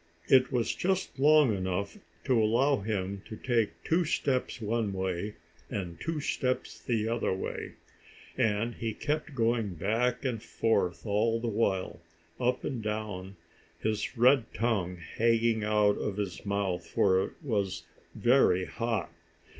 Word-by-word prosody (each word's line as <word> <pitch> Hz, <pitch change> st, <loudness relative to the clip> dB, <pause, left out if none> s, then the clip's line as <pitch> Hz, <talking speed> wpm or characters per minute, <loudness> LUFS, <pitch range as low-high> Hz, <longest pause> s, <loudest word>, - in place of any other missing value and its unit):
It 130 Hz, 0 st, +5 dB
was 120 Hz, -3 st, +1 dB
just 190 Hz, -6 st, -1 dB
long 145 Hz, -5 st, +5 dB
enough 95 Hz, +1 st, -2 dB, 0.3 s
to 125 Hz, -5 st, +3 dB
allow 130 Hz, +6 st, +3 dB
him 100 Hz, -2 st, -3 dB
to 110 Hz, -, -7 dB
take 115 Hz, -3 st, -1 dB
two 170 Hz, +2 st, +2 dB
steps 135 Hz, -6 st, -1 dB
one 110 Hz, -2 st, -1 dB
way, 95 Hz, +2 st, -2 dB, 0.3 s
and 90 Hz, -5 st, -5 dB
two 165 Hz, -2 st, -2 dB
steps 130 Hz, -3 st, -2 dB
the 110 Hz, -3 st, 0 dB
other 115 Hz, +1 st, 0 dB
way. 95 Hz, -, -4 dB, 0.6 s
And 110 Hz, +2 st, +1 dB
he 115 Hz, -2 st, -4 dB
kept 150 Hz, -1 st, -2 dB
going 115 Hz, -5 st, +1 dB
back 115 Hz, -, 0 dB
and 120 Hz, -4 st, -1 dB
forth 110 Hz, -7 st, 0 dB
all 110 Hz, +2 st, +1 dB
the 120 Hz, -, -3 dB
while, 100 Hz, -5 st, -1 dB, 0.4 s
up 125 Hz, 0 st, +1 dB
and 125 Hz, -4 st, -3 dB
down, 105 Hz, -3 st, -4 dB, 0.4 s
his 110 Hz, +3 st, -2 dB
red 125 Hz, 0 st, +4 dB
tongue 100 Hz, -5 st, 0 dB
hanging 115 Hz, +5 st, +1 dB
out 105 Hz, -1 st, +3 dB
of 100 Hz, -1 st, -3 dB
his 100 Hz, -1 st, -4 dB
mouth, 100 Hz, -3 st, -1 dB
for 95 Hz, -1 st, +3 dB
it -, -, -6 dB
was 100 Hz, -8 st, -1 dB, 0.3 s
very 120 Hz, -8 st, +4 dB
hot. 115 Hz, -7 st, -2 dB
110 Hz, 140 wpm, -30 LUFS, 100-125 Hz, 0.6 s, It